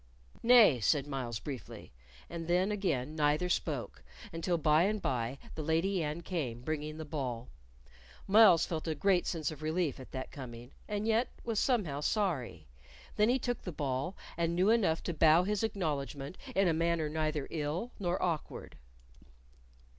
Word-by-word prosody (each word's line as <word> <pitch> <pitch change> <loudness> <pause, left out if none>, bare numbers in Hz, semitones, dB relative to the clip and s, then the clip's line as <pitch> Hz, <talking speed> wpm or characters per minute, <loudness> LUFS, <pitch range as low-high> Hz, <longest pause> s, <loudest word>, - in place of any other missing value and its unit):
"Nay," 230 - +7
said 140 +5 +2
Myles, 130 -5 -4
briefly, 135 -1 -8 0.4
and 165 -1 -6
then 180 +4 +2
again 155 -9 -1
neither 150 +3 +1
spoke, - - -2 0.3
until 170 +1 0
by 155 0 +4
and 210 +4 +1
by 125 -4 -2 0.2
the 160 - -5
Lady 165 +5 +1
Anne 150 +3 -3
came, 140 -10 -3
bringing 155 +1 -3
the 160 - -6
ball. 130 -6 -4 0.8
Myles 200 -4 +7
felt 160 -1 -4
a 160 - -1
great 185 +3 +2
sense 160 -2 -1
of 155 - -10
relief 155 -2 -1
at 130 - -11
that 130 -1 -5
coming, 120 -2 -9 0.2
and 210 0 -2
yet 225 +2 +2 0.2
was 225 -3 -1
somehow 195 - +1
sorry. 145 - -1 0.5
Then 210 +2 +3
he 250 - +3
took 245 -2 -3
the 180 - -5
ball, 140 +3 -2 0.2
and 170 0 0
knew 185 +5 +4
enough 190 -9 +2
to 175 - -2
bow 160 +2 +5
his 210 +1 -1
acknowledgment 145 - -3 0.2
in 195 -1 +4
a 165 - +3
manner 165 -1 +1
neither 155 -2 -2
ill 160 +9 -3
nor 180 -2 -1
awkward. 165 -4 -3
160 Hz, 160 wpm, -32 LUFS, 145-190 Hz, 0.8 s, Nay